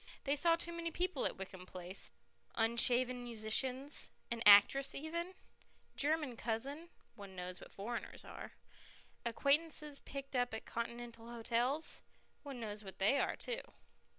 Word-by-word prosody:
They 280 +1 +2
saw 330 +3 +4
too 340 +1 -4
many 335 0 -2
people 355 -3 0
at - - -6
Wickham 190 -1 -8
Place 185 +1 -3 0.5
unshaven 245 +2 +2
musicians, 250 +5 +1 0.2
an 235 -1 -1
actress 210 +7 +8
even, 340 +5 -3 0.6
German 295 -3 +2
cousins 275 +9 -3 0.2
(one 200 -2 -10
knows 180 0 -5
what - - -11
foreigners 230 +4 -5
are), - - -8 0.7
acquaintances 295 +3 +2
picked 275 -1 -7
up 245 -2 +1
at 220 - -6
Continental 235 0 -5
hotels 240 +6 +1 0.4
(one 275 -4 -7
knows 210 -2 -5
what 190 -2 -8
they 215 +9 +4
are - - +1
too). - - -2
245 Hz, 135 wpm, -37 LUFS, 220-290 Hz, 0.7 s, actress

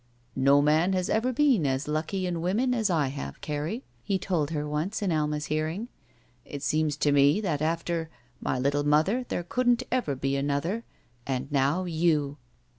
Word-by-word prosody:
"No 140 +2 +4
man 160 +5 +3
has 185 -1 0
ever 230 +4 +1
been 255 - +3
as 135 +2 -1
lucky 160 +5 -1
in 175 -2 -2
women 220 +9 +1
as 220 -4 +1
I 155 -6 +1
have, 140 +1 -6
Carrie," 155 - -3 0.2
he 195 -2 0
told 170 -6 -1
her 150 -2 -2
once 160 +9 -2
in 190 - +1
Alma's 150 -1 0
hearing. 155 +10 -2 0.5
"It 145 +3 -8
seemed 150 0 0
to 145 - +3
me 145 +5 +5
that 160 -8 -1
after 165 +1 -1 0.2
— 120 0 -36
my 130 - -1
little 140 +3 +1
mother 155 +12 +2
there 175 - -2
couldn't 245 +6 +1
ever 240 - 0
be 135 +1 -1
another 145 +11 -1 0.2
— 120 0 -27
and 135 +1 -2
now 145 +6 +2
you!" 155 -4 +1
155 Hz, 185 wpm, -27 LUFS, 145-185 Hz, 0.5 s, me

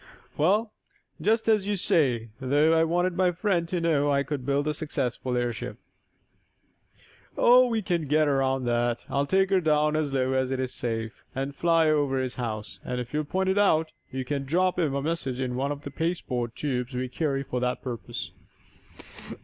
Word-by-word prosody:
"Well, 210 +8 +2 0.5
just 220 +2 +2
as 210 -3 +3
you 205 - +1
say, 130 - +2
though 145 +4 +3
I 160 0 +4
wanted 175 +2 +1
my 180 0 +3
friend 175 -1 0
to 175 +1 -1
know 150 -4 +2
I 140 0 +2
could 140 -3 -5
build 140 +1 +1
a 150 - +1
successful 130 -5 -2
airship." 120 -2 -3 1.6
"Oh, 250 +1 +6
we 225 -3 -1
can 170 -4 -1
get 155 +2 +3
around 135 -2 +1
that. 120 0 0
I'll 140 +1 +1
take 190 +2 +2
her 190 -1 +4
down 150 -1 +2
as 155 -2 0
low 130 -1 +1
as 130 -1 +1
is 130 -1 -2
safe, 115 -1 -4
and 135 +1 -3
fly 165 0 +3
over 145 -3 +2
his 130 -2 -2
house, 110 -2 -5
if 125 0 -4
you'll 150 0 0
point 190 +5 0
it 190 +2 +2
out, 160 -6 +3 0.2
and 130 - -8
you 130 - -2
can 140 0 -2
drop 180 +6 +1
him 150 -5 +1
a 140 - -1
message 145 -5 -2
in 130 -2 -2
one 135 +3 -1
of 145 0 -6
the 140 - -6
pasteboard 130 -7 -2
tubes 125 -3 -3
we 130 +1 -1
carry 135 +1 -1
for 125 -2 -3
that 125 0 -2
purpose." 120 -3 -5
145 Hz, 190 wpm, -27 LUFS, 130-170 Hz, 1.6 s, Oh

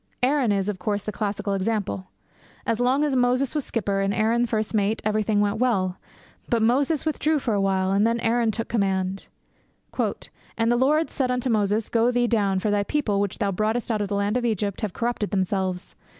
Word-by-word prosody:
Aaron 260 -3 +3
is, 195 -1 0
of 205 -3 -3
course, 205 +2 -2
the 215 - -3
classical 205 -1 -2
example. 195 - -2 0.6
As 230 - 0
long 255 +4 +2
as 290 -3 +1
Moses 250 +1 +2
was 300 -3 -1
skipper, 200 -4 -1
and 195 +1 0
Aaron 230 +2 +2
first 220 -1 -2
mate, 215 +1 +1
everything 215 -1 +1
went 205 +1 0
well. 195 -7 +1 0.5
But 235 -3 +2
Moses 275 +7 +2
withdrew 310 0 +1
for 250 -5 -1
awhile, 190 -1 +1
and 200 +3 +3
then 230 +1 0
Aaron 230 0 +2
took 225 +1 -2
command. 195 -3 -1 0.7
'And 225 +1 -2
the - - +3
Lord 300 +6 +2
said 260 -2 -1
unto 250 0 0
Moses, 210 0 +1
Go, 230 0 +2
get 245 - +1
thee 245 0 +3
down; 205 -5 +1
for 205 +3 0
thy 205 0 +2
people, 210 -3 0
which 200 -1 -1
thou 205 -3 0
broughtest 220 +5 -1
out 215 -2 0
of 205 - -1
the 200 - -2
land 200 +3 0
of 250 - -2
Egypt, 210 -3 -1
have 215 -4 -2
corrupted 235 -3 -2
themselves. 190 -1 -1
215 Hz, 205 wpm, -24 LUFS, 200-240 Hz, 0.7 s, Aaron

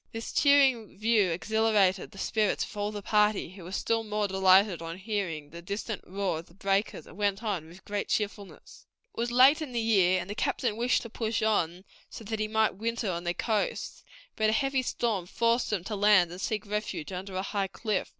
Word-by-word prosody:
This 225 0 -6
cheering 270 -8 +3
view 215 -2 +3
exhilarated 205 +1 +1
the - - -16
spirits 210 +1 0
of - - -9
all 205 0 -2
the 205 -1 -7
party, 210 -4 +2
who 190 -1 -12
were 175 - -9
still 225 +4 0
more 210 -1 -1
delighted 190 -1 +4
on 165 +1 -6
hearing 185 -7 -4
the 170 +1 -9
distant 200 +3 -5
roar 185 -3 -2
of 165 - -11
the 170 - -20
breakers, 195 +1 -1
and - - -14
went 205 +1 0
on 190 -8 -2
with 175 +3 -15
great 205 0 -3
cheerfulness." 205 -1 -4 0.3
It - - -8
was 240 +1 -1
late 265 +6 +6
in 285 -5 -5
the 235 - 0
year, 190 -5 +3
and 175 - -6
the 205 - -4
captain 230 +1 -1
wished 240 +3 +1
to 235 - -8
push 225 -1 -2
on 185 -4 0 0.2
so - - -9
that 220 +1 -4
he 215 - 0
might 220 -2 +1
winter 230 -1 -2
on 170 0 -4
the 175 0 -1
coast, 215 -3 -2 0.3
but 215 0 +2
a - - +2
heavy 270 +2 +1
storm 225 -7 -2
forced 235 +4 +1
them 200 -5 -1
to 215 - -4
land 200 -4 +4
and 180 +2 -8
seek 215 0 -2
refuge 210 -5 -4
under 185 +1 -6
a 190 - -1
high 200 0 -1
cliff. 210 0 -2
205 Hz, 215 wpm, -28 LUFS, 190-225 Hz, 0.3 s, late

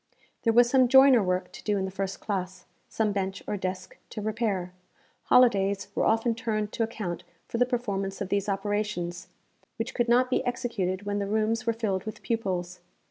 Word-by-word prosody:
There 230 - +3
was 240 +1 +6
some 255 0 +4
joiner 265 -1 +7
work 180 -1 -1
to - - -11
do 210 -1 +1
in 190 - -1
the 190 - -5
first 195 0 -4
classe, 185 -3 -4 0.2
some 220 -2 0
bench 195 -1 -3
or - - -2
desk 185 -1 -5
to 220 - -6
repair. 210 -4 -2 0.5
Holidays 200 -6 +3
were - - +1
often 225 +1 +2
turned 215 -2 -2
to - - -4
account 215 -6 -3 0.2
for 230 - -3
the 245 - +4
performance 200 -6 -2
of 200 - -4
these 200 0 0
operations, 195 -3 -2 0.5
which 225 - -4
could 240 -1 0
not 250 +2 +4
be - - +2
executed 230 -7 -2
when 205 0 -2
the 200 - -2
rooms 220 +2 0
were 230 - +3
filled 205 -5 -2
with 215 - -7
pupils. 185 -6 -2
205 Hz, 190 wpm, -27 LUFS, 190-230 Hz, 0.5 s, joiner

